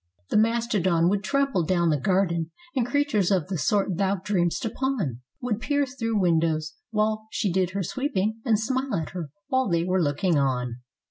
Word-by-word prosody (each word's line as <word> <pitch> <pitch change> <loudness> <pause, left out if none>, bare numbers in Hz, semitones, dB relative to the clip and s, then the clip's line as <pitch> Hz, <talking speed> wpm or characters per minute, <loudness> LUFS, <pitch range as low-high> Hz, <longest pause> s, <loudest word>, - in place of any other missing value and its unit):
The - - +3
mastodon 210 -7 +2
would 200 +1 0
trample 275 -9 +1
down 170 0 +2
the 150 - +1
garden, 170 0 +1 0.3
and 250 -3 +1
creatures 285 -9 +1
of 185 -4 +1
the 190 - -1
sort 195 +4 +1
thou 195 0 +2
dream'st 190 +2 0
upon. 220 - -2 0.2
Would 235 -4 -1
peer 285 +1 +1
through 230 -5 -2
windows 160 -3 +1 0.2
while 215 0 0
she 200 - -1
did 185 -1 +2
her 200 -1 -1
sweeping, 220 - -1
and 220 -4 +2
smile 260 +1 -1
at 160 -4 -3
her 170 -5 -5 0.2
while 260 -4 +2
they 170 -1 +2
were 185 +1 +1
looking 155 +2 +1
on. 125 -3 0
195 Hz, 180 wpm, -26 LUFS, 170-230 Hz, 0.3 s, The